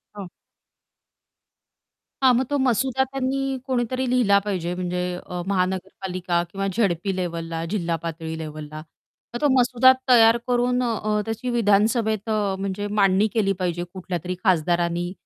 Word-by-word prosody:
हां. 200 -3 -7 2.0
हां, 255 - +6
मग 250 +2 +2
तो 290 - +1
मसुदा 260 +1 +1
त्यांनी 265 0 -2 0.3
कोणीतरी 255 0 -1
लिहिला 230 -6 +4
पाहिजे, 180 -4 -2
म्हणजे 180 0 -2 0.2
अ, 180 -1 -5
महानगरपालिका 185 -2 -1
किंवा 195 0 -2
झेडपी 195 -2 0
लेव्हलला, 165 -2 -3
जिल्हा 170 -5 -1
पातळी 160 -1 -5
लेव्हलला. 155 -1 -7 0.5
मग 240 - -3
तो 295 - +4
मसुदा 250 +1 +5 0.2
तयार 230 -1 +7
करून 245 0 +1
अ, 215 -3 -1
त्याची 225 +3 -4
विधानसभेत 220 -1 +1
अ, 205 -3 0
म्हणजे 200 +1 -3
मांडणी 195 +1 +4
केली 205 -4 +2
पाहिजे 175 -1 -1
कुठल्यातरी 180 -1 -4
खासदारांनी. 175 -1 +1
200 Hz, 130 wpm, -23 LUFS, 175-240 Hz, 2.0 s, तयार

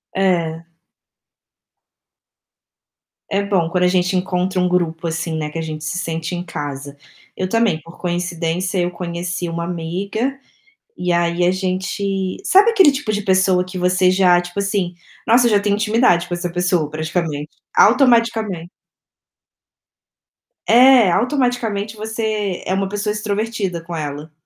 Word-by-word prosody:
É. 170 -3 0 2.6
É 200 0 0
bom 190 -5 0
quando 180 +1 0
a - - +5
gente 180 +1 +1
encontra 185 0 -1
um 180 - +2
grupo 170 -2 -1
assim, 160 0 -3
né, 150 -1 -3
que 160 - -7
a - - -2
gente 155 -1 -6
se 155 +3 -3
sente 165 0 -3
em 175 - -4
casa. 145 -4 -6 0.4
Eu 185 - -2
também, 210 -6 +1
por 165 +2 -15
coincidência, 175 +1 -2
eu 175 0 0
conheci 175 0 -4
uma 170 0 -3
amiga, 190 +10 -3 0.6
e 180 - -1
aí 170 0 +1
a 180 - +4
gente 185 +1 -2
sabe 410 +4 +5
aquele 385 -10 +6
tipo 270 -5 -3
de 205 0 -1
pessoa 190 -2 +2
que 185 +1 -8
você 180 +1 +3
já, 185 -2 +4
tipo 175 +2 -6
assim, 195 -3 -1 0.3
nossa 240 +2 +5
eu - - +1
já 205 - +4
tenho 200 0 +1
intimidade 215 -4 +2
com - - -5
essa 175 0 -3
pessoa 180 -3 0
praticamente? 155 -1 -3 0.3
Automaticamente. 225 -7 +3 2.0
É, 245 -3 +7
automaticamente 225 -2 -1
você 215 -3 -3
é 185 - -1
uma 195 0 0
pessoa 205 +1 -2
extrovertida 210 -3 -2
com 170 +1 -7
ela 150 0 -5
180 Hz, 145 wpm, -19 LUFS, 170-210 Hz, 2.6 s, É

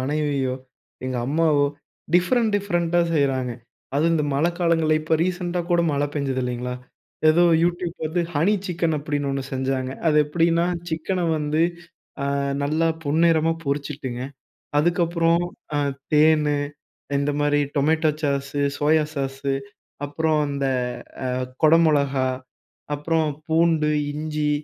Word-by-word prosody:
மனைவியோ, 140 -2 0 0.5
எங்க 130 -1 -2
அம்மாவோ, 150 0 +3 0.5
டிஃபரண்ட் 220 +6 +3
டிஃபரண்ட்டா 175 -4 +1
செய்றாங்க. 130 -4 +1 0.4
அதுவும் 160 +4 +3
இந்த 150 -2 +1
மழைக்காலங்கள்ல 165 0 +2
இப்போ 155 +1 0
ரிசென்ட்டா 175 0 -1
கூட 175 0 +4
மழை 145 0 +1
பெஞ்சது 135 -3 -1
இல்லைங்களா? 125 0 -3 0.6
ஏதோ 170 +3 +4 0.2
YouTube 175 0 0
பார்த்து 160 +3 0
"ஹனி 170 +9 +3
சிக்கன்" 170 -2 0
அப்டின்னு 145 -1 -2
1 135 0 -2
செஞ்சாங்க. 130 0 -1 0.2
அது 150 - +3
எப்டினா, 165 +2 +2 0.3
சிக்கன்ன 175 +2 -1
வந்து 150 +1 0 0.6
ஆ - - 0 0.4
நல்லா 155 +3 +1 0.2
பொன்னிறமா 160 +2 +3
பொறிச்சுட்டுங்க, 140 -3 -3 0.6
அதுக்கப்புறம் 170 +1 +2 0.3
அ - - +2 0.3
தேன்னு, 150 -1 +4 0.6
இந்த 140 +1 0
மாரி 145 0 +2 0.2
டொமேட்டோ 155 +2 +3
ச்சாஸ்சு, 140 0 -1 0.2
சோயா 155 +1 +3
சாஸ்சு 135 0 -2 0.5
அப்புறம் 155 +1 0
அந்த 140 -1 -2 0.6
அ - - -1 0.3
குடை 155 +1 +7
மிளகாய், 135 -3 +1 0.6
அப்புறம் 160 +1 0 0.2
பூண்டு, 160 -1 +3 0.2
இஞ்சி 150 0 -2
150 Hz, 115 wpm, -23 LUFS, 140-165 Hz, 0.6 s, குடை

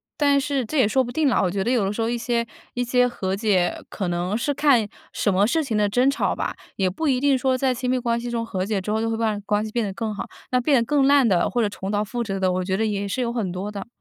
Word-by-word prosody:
但 285 -3 +3
是 275 -1 -1
这 310 - -3
也 255 -6 +5
说 260 +4 +2
不 245 - -6
定 310 +3 +1
了。 255 - +3
我 185 - +1
觉 195 +1 -1
得 240 - 0
有 235 -5 +2
的 195 - 0
时 210 - -6
候， 225 - +1
一 240 - 0
些 235 0 -1 0.3
一 245 - 0
些 250 0 +3
和 190 -5 -3
解， 195 -4 +1
可 195 -4 -3
能 175 +5 -1
是 285 +4 -1
看 275 -7 +3 0.3
什 205 - +1
么 200 +3 +3
事 320 +5 +1
情 250 -6 -3
的 210 -1 +2
争 250 +6 +3
吵 - - 0
吧。 - - -3 0.2
也 190 -2 +1
不 300 - -2
一 255 -2 +2
定 280 -1 +3
说 260 0 +1
在 260 -1 +1
亲 250 +1 -3
密 255 - +2
关 235 -1 0
系 240 - -5
中， 230 -1 -2
和 190 -5 -3
解 205 +1 -1
之 190 +3 -4
后 220 +1 0
就 225 - 0
会 225 - -1
把 220 -2 0
关 205 +1 -1
系 215 - -6
变 235 -1 0
得 200 - -2
更 220 +1 -3
好。 205 - -5 0.2
那 250 -1 +2
变 275 +2 +3
得 230 - 0
更 275 +1 +3
烂 280 -3 +5
的， 180 -5 +2
或 240 - 0
者 - - +2
重 190 -1 -6
蹈 205 0 0
覆 235 +3 -3
辙 195 -3 -3
的， 185 -1 +2
我 185 0 -1
觉 190 +1 -1
得 220 - +1
也 200 -1 -2
是 230 - -3
有 235 -1 -1
很 210 -7 -2
多 190 +4 -4
的。 200 0 -7
230 Hz, 340 characters per minute, -23 LUFS, 200-255 Hz, 0.3 s, 也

